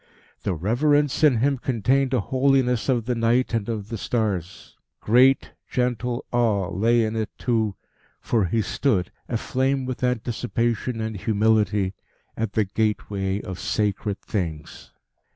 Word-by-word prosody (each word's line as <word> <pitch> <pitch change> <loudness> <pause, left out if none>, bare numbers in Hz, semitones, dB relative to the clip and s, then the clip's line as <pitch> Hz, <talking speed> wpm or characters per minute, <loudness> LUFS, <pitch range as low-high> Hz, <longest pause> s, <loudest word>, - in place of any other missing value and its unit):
The 95 - -1
reverence 145 - +1
in 145 -6 +6
him 135 0 +2
contained 130 +2 +1
a 125 -4 +2
holiness 130 0 +1
of 120 -4 +1
the 125 - 0
night 120 +2 +1
and 115 -1 -1
of 105 -2 -4
the 115 - -4
stars; 95 -8 -3 0.2
great, 130 +4 +4 0.2
gentle 125 -1 -1
awe 110 -7 +1
lay 115 +4 +3
in 110 0 -2
it 110 -2 -1
too; 110 -5 0 0.4
for 110 -5 +1
he 110 +5 0
stood, 100 -10 0 0.2
aflame 130 +3 0
with 130 0 -5
anticipation 120 -1 -1
and 110 0 -3
humility, 105 -1 +1 0.4
at 110 -2 -3
the 110 - +2
gateway 100 -1 -1
of 95 -1 -7
sacred 105 -1 -1
things. 80 -7 -4
115 Hz, 135 wpm, -24 LUFS, 105-125 Hz, 0.4 s, in